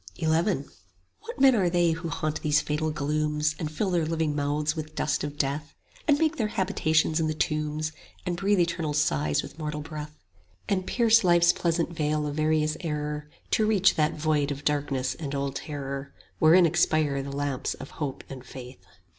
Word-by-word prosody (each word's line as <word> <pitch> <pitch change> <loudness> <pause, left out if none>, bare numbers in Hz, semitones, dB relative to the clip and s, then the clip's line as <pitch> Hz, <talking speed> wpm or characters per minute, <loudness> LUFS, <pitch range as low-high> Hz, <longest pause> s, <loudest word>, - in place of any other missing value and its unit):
XI - - -2 0.9
What 465 -9 -9
men 265 -1 +7
are 190 -5 +2
they 175 -1 +3
who 165 +1 -3
haunt 155 -1 -2
these 150 0 +3
fatal 150 +1 -1
glooms, 150 +1 0
And 155 -3 -2
fill 190 +5 -1
their 175 -2 +2
living 160 -1 -1
mouths 150 +2 0
with 155 -1 -6
dust 150 - 0
of 145 0 -5
death, 145 +2 -2 0.3
And 290 -2 +5
make 320 +1 +1
their 220 - +1
habitations 160 -5 +1
in 160 - +1
the 155 - -2
tombs, 155 0 -1 0.3
And 180 -1 -1
breathe 195 +2 +2
eternal 170 -3 0
sighs 75 - +1
with 160 - -11
mortal 150 -1 -3
breath, 150 0 -7 0.5
And 185 -2 -1
pierce 230 -2 +4
life's 175 -1 +5
pleasant 170 0 0
veil 150 -1 0
of 145 - -3
various 155 0 +1
error 150 -2 -3
5 - - -34
To 220 - +3
reach 195 -3 +4
that 155 0 +1
void 150 -2 +1
of 145 0 -5
darkness 140 -3 0
and 145 -2 -5
old 140 0 -2
terror 140 -2 -6 0.2
Wherein 170 +3 +6
expire 155 -4 +2
the 140 - -6
lamps 140 -1 -2
of 135 - -10
hope 140 -3 -3
and 130 -2 -9
faith? 125 -4 -11
155 Hz, 185 wpm, -27 LUFS, 145-170 Hz, 0.9 s, men